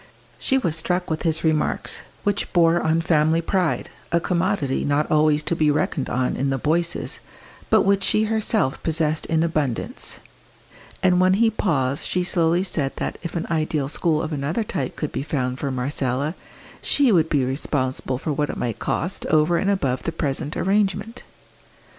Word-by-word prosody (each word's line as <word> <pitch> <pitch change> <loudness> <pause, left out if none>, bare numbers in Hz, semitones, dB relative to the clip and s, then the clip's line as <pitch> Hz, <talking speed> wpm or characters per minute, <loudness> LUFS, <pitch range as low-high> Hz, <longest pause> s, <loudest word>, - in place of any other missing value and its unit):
She 265 - +2
was 170 -12 0
struck 180 +2 -1
with 160 - -1
his 160 -2 0
remarks, 155 -2 0 0.2
which 205 -1 -1
bore 170 -1 +4
on 160 +1 +2
family 160 0 +3
pride, 175 0 0 0.2
a 170 - +3
commodity 170 -5 0
not 145 +1 0
always 155 0 +3
to 170 - -1
be 155 -2 +2
reckoned 145 -1 0
on 125 0 0
in 135 +1 0
the 135 - 0
Boyces, 165 +5 -1 0.5
but - - +5
which 195 0 +3
she 215 +3 +2
herself 220 - 0
possessed 155 -1 0
in 160 -1 +2
abundance; 155 -7 -1 0.8
and 180 -1 +4
when 185 +1 +4
he 225 +2 +3
paused 140 -10 0
she 180 - 0
slowly 175 0 +2
said 150 -7 -1
that - - -4
if 170 -1 -6
an 170 - -1
ideal 155 -3 0
school 155 +1 0
of 155 0 -3
another 150 +9 -1
type 190 -4 -3
could 150 - -3
be - - -3
found 130 -3 -2
for 140 - -2
Marcella, 130 +2 -1 0.5
she 280 -4 +3
would 165 -5 +3
be 140 -5 +2
responsible 130 -1 -1
for 150 +2 -2
what 145 0 -1
it - - -4
might 115 -3 -3
cost 175 +4 -2
over 155 +2 +3
and 195 - 0
above 135 -11 0
the 165 - -2
present 150 0 -3
arrangement. 205 +4 0
160 Hz, 175 wpm, -23 LUFS, 145-180 Hz, 0.8 s, but